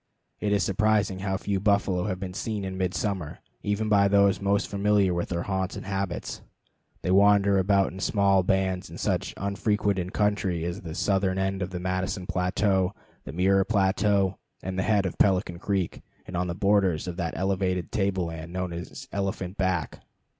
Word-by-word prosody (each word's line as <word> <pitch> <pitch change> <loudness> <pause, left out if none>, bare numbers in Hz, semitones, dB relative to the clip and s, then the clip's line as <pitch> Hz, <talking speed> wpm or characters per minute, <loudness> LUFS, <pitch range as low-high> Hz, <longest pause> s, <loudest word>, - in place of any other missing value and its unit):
It 105 - -1
is 100 -3 +3
surprising 100 +1 +1
how 95 0 -1
few 100 -1 -1
buffalo 100 -2 +1
have 95 -3 -2
been 95 -1 -5
seen 105 -1 -3
in 95 0 -4
midsummer, 95 -2 -2 0.2
even 105 +2 -1
by 100 -2 +4
those 100 0 +3
most 100 0 +1
familiar 100 -2 +2
with 85 0 -2
their 85 -1 -2
haunts 95 0 -2
and - - -7
habits. 95 -2 -3 0.6
They 90 - 0
wander 100 0 +5
about 100 0 +3
in 95 - -8
small 100 -1 +3
bands 95 0 0
in - - -9
such - - -1
unfrequented 100 -2 0
country 100 -6 0
as 85 +4 -4
the 80 -2 -7
southern 95 -1 +1
end 95 0 -1
of 90 - -2
the 90 -1 -5
Madison 95 +1 -2
plateau, 95 +1 +1 0.3
the - - -6
Mirror 95 +2 +3
plateau, 100 -1 +2 0.2
and 95 0 -4
the 95 - 0
head 105 -3 +3
of 95 - -4
Pelican 90 -3 +2
Creek, 95 -2 -2 0.2
and 95 - -7
on 90 +1 0
the 85 - -3
borders 100 -5 +2
of 90 - -4
that 85 -3 -3
elevated 95 -1 -1
table 95 -3 0
land 80 0 -7
known 90 -1 -3
as 85 +1 -7
Elephant 95 -2 -3
Back. 95 -6 -1
95 Hz, 180 wpm, -26 LUFS, 90-100 Hz, 0.6 s, wander